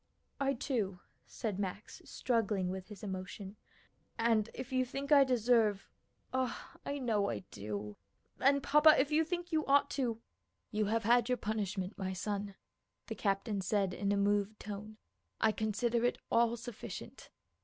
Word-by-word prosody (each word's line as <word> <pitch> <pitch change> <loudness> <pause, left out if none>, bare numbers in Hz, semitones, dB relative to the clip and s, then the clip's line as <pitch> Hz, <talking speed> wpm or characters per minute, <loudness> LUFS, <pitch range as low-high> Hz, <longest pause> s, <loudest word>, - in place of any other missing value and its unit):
"I, 275 0 +1
too," 215 -8 -2 0.3
said 210 -5 -4
Max, 200 +2 -5
struggling 210 -6 0
with 190 0 -6
his 210 -2 -11
emotion, 190 +1 -6 0.6
"and 225 -1 +2
if 255 +1 -6
you 255 0 +3
think 275 +3 -5
I 285 -2 +9
deserve 230 -5 +2 0.5
(oh, 260 -1 0 0.2
I 285 - -3
know 225 -7 +1
I - - -3
do), 105 0 -5 0.4
and, 275 +1 +4
papa, 300 +2 +7
if 280 +3 +2
you 310 +2 +4
think 350 +2 -4
you 315 -1 +2
ought 280 +1 +4
to 240 -5 -1 0.3
" - - -50
"You 215 -1 +1
have 225 +2 0
had 240 +2 +4
your 250 - +2
punishment, 205 -3 -3
my 190 -1 -2
son," 200 +1 -3 0.5
the - - -4
captain 200 0 0
said 195 0 +1
in 200 +1 -1
a 205 - +2
moved 205 +1 +1
tone. 210 +1 -7 0.4
"I 220 - +4
consider 230 +2 0
it 245 - +2
all 235 0 +3
sufficient. 235 -1 -8
220 Hz, 160 wpm, -34 LUFS, 200-250 Hz, 0.6 s, I